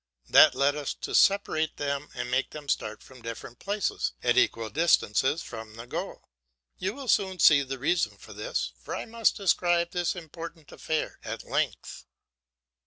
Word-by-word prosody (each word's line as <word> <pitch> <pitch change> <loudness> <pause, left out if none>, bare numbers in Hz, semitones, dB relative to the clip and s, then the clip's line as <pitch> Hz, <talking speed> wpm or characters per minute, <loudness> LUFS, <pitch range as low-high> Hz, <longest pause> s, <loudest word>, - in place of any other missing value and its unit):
That - - +8
led 140 +1 +2
us 145 -2 -3
to - - -6
separate 160 -6 +3
them 140 0 -2
and 125 0 -4
make 130 +2 +1
them 150 -1 -9
start 110 -5 -2
from 130 -2 -15
different 115 +1 -8
places 205 0 -1
at 120 -1 +3
equal 115 -3 +2
distances 155 -2 +2
from 110 -2 -9
the 115 +1 -8
goal. - - -6 0.5
You 190 +4 -2
will 275 -2 -8
soon 190 -4 +2
see 150 -4 +7
the 135 -1 -4
reason 165 +7 0
for - - -12
this, - - -3
for - - -5
I - - -4
must 230 -1 +1
describe 175 -3 +2
this 175 0 -1
important 165 -2 -9
affair 160 -1 -3
at - - -5
length. - - -3
150 Hz, 170 wpm, -28 LUFS, 125-175 Hz, 0.5 s, That